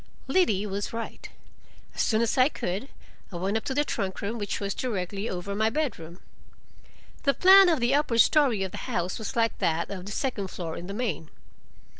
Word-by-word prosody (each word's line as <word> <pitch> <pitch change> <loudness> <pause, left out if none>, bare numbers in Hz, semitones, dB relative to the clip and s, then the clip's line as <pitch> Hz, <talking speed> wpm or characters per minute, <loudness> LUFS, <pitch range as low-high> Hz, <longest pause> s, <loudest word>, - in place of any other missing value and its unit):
Liddy 265 - +2
was 200 +1 -4
right. 230 0 -6 0.6
As - - -2
soon 220 0 +2
as 230 - 0
I 255 +2 +5
could, 205 - -4 0.4
I - - -9
went 190 +4 -1
up 220 - -1
to 265 - -2
the 295 +1 +2
trunk 190 -7 -3
room, 225 +3 -3
which 205 -1 -3
was 200 -1 -2
directly 200 -3 -3
over 185 +2 -4
my 220 +2 +2
bedroom. 205 - -3 1.0
The 280 -2 +2
plan 385 0 +8
of 320 -4 +2
the 240 +2 +2
upper 285 -5 +1
story 245 -5 +4
of 190 - -4
the - - -7
house 180 +3 -2
was 220 +4 -5
like 230 -1 +1
that 165 +3 0
of 190 -1 -6
the - - -6
second 220 -5 -2
floor, 165 -3 -6
in 175 - -7
the 200 - -6
main. 210 -10 -3
215 Hz, 200 wpm, -27 LUFS, 190-255 Hz, 1.0 s, plan